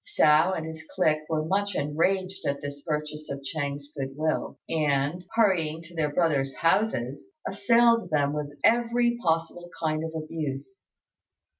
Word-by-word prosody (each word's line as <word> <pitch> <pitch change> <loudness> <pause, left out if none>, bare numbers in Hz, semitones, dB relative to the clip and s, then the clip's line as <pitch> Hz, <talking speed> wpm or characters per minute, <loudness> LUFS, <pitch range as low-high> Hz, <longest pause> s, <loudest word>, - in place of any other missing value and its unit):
Hsiao 155 +5 +4
and 160 -3 -3
his 160 -1 -7
clique 155 -4 +1
were 155 -1 0
much 200 +4 0
enraged 185 +6 0
at 140 0 0
this 145 0 -6
purchase 150 0 -4
of 140 0 -4
Ch'êng's 145 0 -4
good 135 -1 -5
will, 155 +1 -1
and, 150 +2 0
hurrying 170 -8 +2
to 170 +1 -12
their 150 -2 0
brothers' 145 -5 +1
houses, 165 - 0 0.2
assailed 230 +1 +3
them 145 -2 +1
with 145 -1 -4
every 240 0 +3
possible 165 0 -1
kind 155 -1 0
of 160 0 -5
abuse. 155 +2 -5
155 Hz, 145 wpm, -27 LUFS, 145-185 Hz, 0.2 s, Hsiao